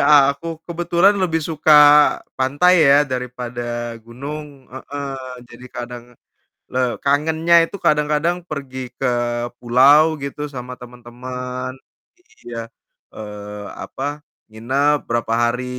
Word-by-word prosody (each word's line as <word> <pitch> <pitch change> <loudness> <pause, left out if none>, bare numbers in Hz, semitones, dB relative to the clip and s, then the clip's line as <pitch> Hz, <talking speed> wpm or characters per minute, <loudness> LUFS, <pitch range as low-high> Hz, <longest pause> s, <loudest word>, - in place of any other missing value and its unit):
aku 140 +1 +4 0.2
kebetulan 175 +3 +2
lebih 165 -4 0
suka 155 -1 +2 0.7
pantai 145 +7 +3 0.2
ya 145 +1 +6
daripada 125 -2 -5 0.4
gunung, 140 +3 -8
heeh. 140 +1 -6 0.4
Jadi 120 +1 -13
kadang 120 0 -7 0.7
le 130 - -1 0.2
kangennya 160 +4 +2
itu 200 - -8
kadang-kadang 150 +3 +2
pergi 140 -5 -6 0.2
ke 135 - -1 0.5
pulau 140 +6 +5
gitu 145 +1 -4
sama 125 0 -7
teman-teman. 125 +1 -7 0.7
Iya, 115 -1 -6 0.6
eee, 105 -1 -8 0.2
apa, - - -8 0.5
nginep 135 +7 +1
berapa 115 -1 -1
hari 120 +2 0
135 Hz, 105 wpm, -20 LUFS, 125-150 Hz, 0.7 s, ya